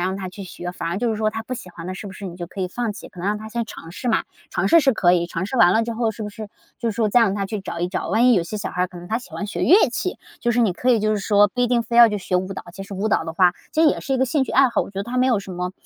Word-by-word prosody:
让 185 +2 -1
他 190 -1 -5
去 195 +2 -9
学， 175 -1 -6
反 170 -2 -4
而 175 +3 -2
就 235 0 0
是 220 - -1
说 215 0 +1
他 225 +1 -5
不 235 - -8
喜 230 -7 -9
欢 170 0 -9
的 185 - -4
是 205 - -8
不 195 - -8
是 200 - -9
你 175 -1 -8
就 175 - -6
可 190 +3 -8
以 185 - -1
放 230 +3 -2
弃？ - - -10
可 180 - -12
能 180 - -3
让 210 +1 0
他 220 +1 -8
先 235 +1 -2
尝 165 -6 -10
试 245 - -4
嘛， 220 - +2 0.3
尝 - - 0
试 335 - +7
是 270 -3 +3
可 180 -5 +3
以， 175 -1 +2
尝 170 +2 -3
试 260 - -4
完 175 -6 +6
了 225 - +3
之 230 +1 -3
后 225 -1 0
是 220 - -7
不 210 - -4
是 215 0 -8 0.3
就 235 -1 -1
是 - - -6
说 225 -1 +1
再 240 +4 +4
让 210 -4 +3
他 200 -1 -2
去 210 0 -4
找 170 -3 -6
一 175 - 0
找， 180 - -3
万 225 +7 +4
一 245 - +6
有 180 - +2
些 175 +6 -5
小 205 - -4
孩 180 - -1
儿 185 - +1
可 180 -1 -11
能 175 - -10
他 225 - 0
喜 245 - -14
欢 205 - -5
学 210 - -4
乐 380 0 +6
器， 365 +9 -3 0.2
就 240 - +1
是 240 - +2
你 215 -5 +3
可 250 +8 0
以 235 -3 +4
就 215 +1 +1
是 210 - 0
说 205 0 +4
不 245 - -4
一 245 - +4
定 240 -1 +2
非 235 +1 -3
要 235 -1 +9
去 210 -1 -2
学 185 -1 -1
舞 185 +1 -2
蹈， 195 - -7
其 195 - -8
实 195 0 -8
舞 200 +3 -1
蹈 160 - +1
的 160 - -5
话， 180 +1 +4 0.2
这 320 - +2
也 305 - +3
是 270 - -3
一 - - +2
个 260 - +3
兴 265 +2 +1
趣 - - -6
爱 270 +1 +5
好， 235 - 0
我 - - -9
觉 195 - -7
得 - - -1
它 240 +3 -5
没 255 +1 +3
有 245 -5 +3
什 195 -1 -8
么 180 +1 -3
210 Hz, 415 characters per minute, -22 LUFS, 185-235 Hz, 0.3 s, 要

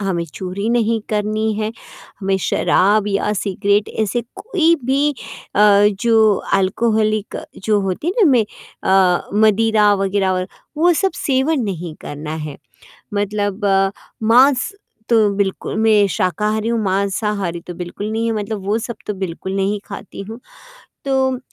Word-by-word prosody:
हमें 185 -4 -1
चोरी 190 +3 -4
नहीं 230 -1 +1
करनी 215 +1 0
है, 215 +1 -2 0.5
हमें 195 0 +1
शराब 205 +2 +3
या 205 +1 0
सिगरेट 200 0 0
ऐसे 235 +3 -1
कोई 355 -7 +2
भी 280 +3 +2 0.4
अ, 205 0 +6
जो 220 -3 +4 0.2
अल्कोहॉलिक 215 +2 +1 0.3
जो 210 -2 +2
होती 195 - -3
है 360 - +1
ना 300 - +5
में 240 -4 +4 0.4
अ, 185 -2 +3 0.2
मदिरा 215 -1 +4
वगैरह 195 0 0
और 185 0 -1 0.3
वो 345 +3 +4
सब 385 - +2
सेवन 270 +2 +1
नहीं 175 -5 -4
करना 150 +2 -6
है। 145 - -7 0.6
मतलब 205 0 -1
अ, 195 -1 +3 0.4
मांस 255 +3 +4 0.4
तो 220 -3 +4
बिल्कुल 195 0 -2
मैं 215 -2 +4
शाकाहारी 210 +6 0
हूँ, 230 0 0
मांसाहारी 195 -2 -1
तो 175 - -5
बिल्कुल 175 +4 -6
नहीं 225 +1 -1
है 230 - +1
मतलब 205 -1 -4
वो 210 +3 +1
सब 235 +1 -5
तो 210 - -1
बिल्कुल 190 0 -4
नहीं 195 +1 0
खाती 200 0 -8
हूँ। 225 +2 -8 0.7
तो 265 -2 +1
210 Hz, 145 wpm, -19 LUFS, 195-225 Hz, 0.7 s, अ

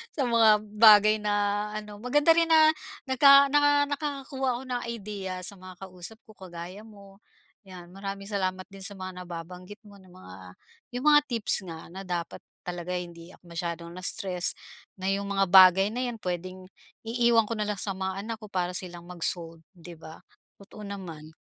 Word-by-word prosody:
sa 285 - 0
mga 225 -3 +5 0.2
bagay 215 -1 +7
na 205 0 0
ano, 210 -1 -7
maganda 295 +6 +3
rin 335 0 +2
na 315 -1 +6 0.3
naka 275 +1 +6
naka 290 0 +4
nakakakuha 275 -2 -4
ako - - -8
ng 245 - -2
idea 200 -4 -5
sa 190 - -7
mga 185 0 -11
kausap 185 +3 -10
ko 220 - -17
kagaya 180 -1 -9
mo, 200 -3 -16 0.5
yan. 180 -2 -12
Maraming 195 +1 -6
salamat 185 -2 -2
din 195 - -12
sa 200 +1 -7
mga 185 -1 -7
nababanggit 180 +4 -9
mo 205 -1 -16
na 190 - -19
mga 175 - -13 0.6
yung 250 +3 -4
mga 295 0 +7
tips 230 -5 -1
nga 165 -1 -9
na 190 +2 -8
dapat 175 -2 -4 0.2
talaga 180 0 -5
hindi 170 0 -8
ako - - -30
masyadong 170 0 -5
na-stress, 185 0 -1 0.4
na 190 0 -2
yung 200 0 -2
mga 195 -1 +1
bagay 190 +1 +7
na 250 +2 -2
yan 240 - -4
pwedeng 185 +1 -5 0.4
iiwan 235 0 +3
ko 215 +1 -5
na 210 - -1
lang 210 - -1
sa 200 +1 -3
mga 190 0 -4
anak 225 +1 -6
ko 215 - -10
para 180 -3 -2
silang 175 -1 -6
mag-solve, 165 -1 -4 0.2
'di 170 -1 -12
ba? 160 0 -12 0.3
Totoo 200 +1 -15
naman. 165 -6 -9
195 Hz, 175 wpm, -27 LUFS, 180-225 Hz, 0.6 s, bagay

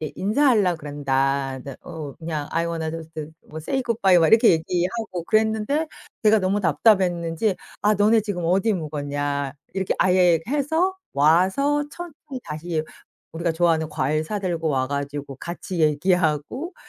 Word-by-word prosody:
인사하려고 205 - +2
그런다. 135 -2 -1
네 140 -2 -8
어 155 -5 -7
그냥 155 -3 -4
"I 165 +1 0
wanna 165 -1 -3
just" 160 0 -7 0.4
뭐 155 - -7
"say 265 - -2
good 230 -2 -2
bye." 190 -2 +6
막 165 - +4
이렇게 225 +1 +6
얘기하고 180 +3 -2
그랬는데 220 - +1 0.4
제가 215 0 +6
너무 195 +2 0
답답했는지 180 -1 +2 0.3
"아 210 +1 +4
너네 210 +2 +4
지금 195 -5 -4
어디 190 +6 +2
묵었냐?" 145 -3 -3 0.2
이렇게 190 -1 -1
아예 180 -3 +4
해서 320 +7 0 0.2
와서 190 - +3
천천히 300 -5 -9
다시 155 +1 -3 0.5
우리가 170 +1 -1
좋아하는 165 -1 +1
과일 155 +1 -1
사 205 +6 -3
들고 170 -4 -1
와 130 -3 +1
가지고 140 -1 -4
같이 175 +4 -6
얘기하고 160 - +1
175 Hz, 355 characters per minute, -23 LUFS, 155-210 Hz, 0.5 s, bye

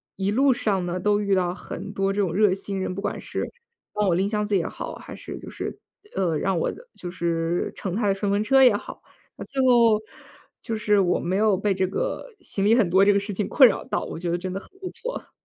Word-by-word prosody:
一 195 +1 -1
路 270 +5 +4
上 205 -6 0
呢 175 +1 -2
都 205 +2 +2
遇 200 -1 +2
到 180 -1 +1
很 - - -8
多 195 0 0
这 200 - -2
种 190 -5 +1
热 205 +1 +4
心 195 +1 -3
人， 185 - -3
不 - - -5
管 - - -3
是 - - -4 0.5
帮 210 -1 +1
我 175 - +3
拎 190 +3 +1
箱 210 0 -1
子 205 -1 +1
也 170 - -1
好， - - -6
还 - - -10
是 - - -8
就 - - -11
是 - - -5 0.4
呃， 175 -4 +1
让 190 -2 0
我 165 - 0 0.2
就 175 - -7
是 170 -1 -1
乘 190 -2 -4
他 215 -1 0
的 195 - +2
顺 200 0 -1
风 200 +1 +2
车 270 +4 +5
也 245 -5 +6
好， - - -7 0.3
那 - - -8
最 270 -1 -2
后， 235 -4 +5 0.6
就 230 - -3
是 210 -1 +2
我 180 -2 +2
没 180 +2 -1
有 210 -1 +3
被 200 +1 0
这 190 0 +1
个， - - -3
行 195 0 -3
李 215 - +5
很 225 -7 +3
多 190 +3 +5
这 205 - +5
个 200 - +3
事 200 +1 -5
情 205 - -1
困 260 -4 +7
扰 - - -3
到 - - -2
我 - - -6
觉 170 0 -3
得 175 - +1
真 185 +1 -4
的 195 - -3
很 - - -16
不 370 - -5
错。 - - -7
200 Hz, 275 characters per minute, -24 LUFS, 185-215 Hz, 0.6 s, 困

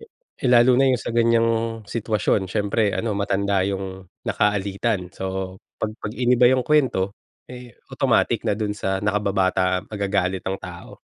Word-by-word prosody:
Eh 455 - -7
lalo 125 +1 +6
na 135 0 +4
yung 125 - +1
sa 115 - -4
ganyang 115 0 +3 0.4
sitwasyon 105 -3 0
siyempre 105 +1 +1
ano 115 -2 -1
matanda 100 -1 0
yung 95 -1 -5 0.2
naka-alitan 100 -1 0
so 95 0 -4 0.2
pag 110 - -2
pag 105 - -4
iniba 125 0 +4
yung 130 -1 +2
kwento, 125 -10 +2 0.4
eh 125 -2 -11 0.2
automatic - - +1
na - - +2
dun 105 -2 -1
sa 95 -1 -2
nakababata 95 -2 +1
magagalit 95 -2 -1
ang 95 +1 -2
tao. 90 -2 -10
105 Hz, 145 wpm, -23 LUFS, 95-115 Hz, 0.4 s, lalo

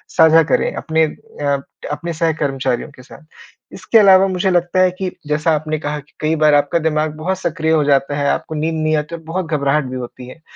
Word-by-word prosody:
साझा 160 -1 +6
करें - - +1
अपने 160 0 0
अ, 145 -2 -4 0.3
अपने 170 +3 -4
सहकर्मचारियों 140 -6 -1
के - - -16
साथ। 155 - -15 0.5
इसके 230 - +1
अलावा 195 -2 +6
मुझे 185 0 0
लगता 175 +1 +1
है 185 -1 +4
कि 185 -1 -2 0.2
जैसा 150 +2 +1
आपने 155 0 -3
कहा 150 0 -4
कि 145 0 -18
कई 155 +1 0
बार 155 -1 +4
आपका 145 +3 +2
दिमाग 155 -1 -1
बहुत 185 +4 -2
सक्रिय 160 -3 -1
हो 155 -2 +3
जाता 140 0 +1
है, 145 -1 0
आपको 155 - -2
नींद 160 +2 -1
नहीं 155 0 +1
आती 150 +3 -4
और 165 - -10
बहुत 170 +3 -3
घबराहट 145 -1 +1
भी - - -5
होती 125 0 -8
है। 145 +6 -13
155 Hz, 210 wpm, -18 LUFS, 145-170 Hz, 0.5 s, साझा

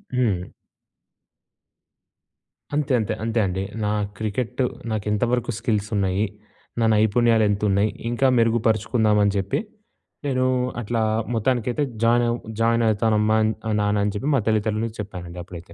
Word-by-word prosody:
హ్మ్. 100 -8 0 2.2
అంతే 145 -3 0
అంతే. 110 0 -1
అంతే 115 +1 0
అండి. 95 0 -2 0.2
నా - - +1 0.3
క్రికెట్ 115 +4 -2 0.3
నాకు 110 -2 -2
ఎంతవరకు 120 +3 0
స్కిల్స్ 105 -4 -1
ఉన్నాయి? 100 +1 +1 0.5
నా 115 - +3
నైపుణ్యాలు 110 +1 +3
ఎంత 100 0 -1
ఉన్నాయి? 100 +2 +2 0.2
ఇంకా 120 +3 +2
మెరుగుపరుచుకుందామని 110 -2 +2
జెప్పి. 100 -1 0 0.7
నేను 130 -2 +1 0.4
అట్లా 115 +1 -2 0.3
మొత్తానికైతే 120 +4 0 0.2
జాయిన్ 120 +1 +4
అవ్ 120 - 0 0.2
జాయిన్ 115 0 +3
అయితానమ్మా, 110 0 +2 0.3
ఆహ్, 110 - +1
నాన్న 105 0 +1
అని 105 - 0
చెప్పి. 135 +8 -2
మా 130 - +2
తల్లిదండ్రులకు 110 +1 0
చెప్పానండి 90 -4 -7
అప్పుడైతే. 85 -2 -11
110 Hz, 125 wpm, -23 LUFS, 100-120 Hz, 2.2 s, జాయిన్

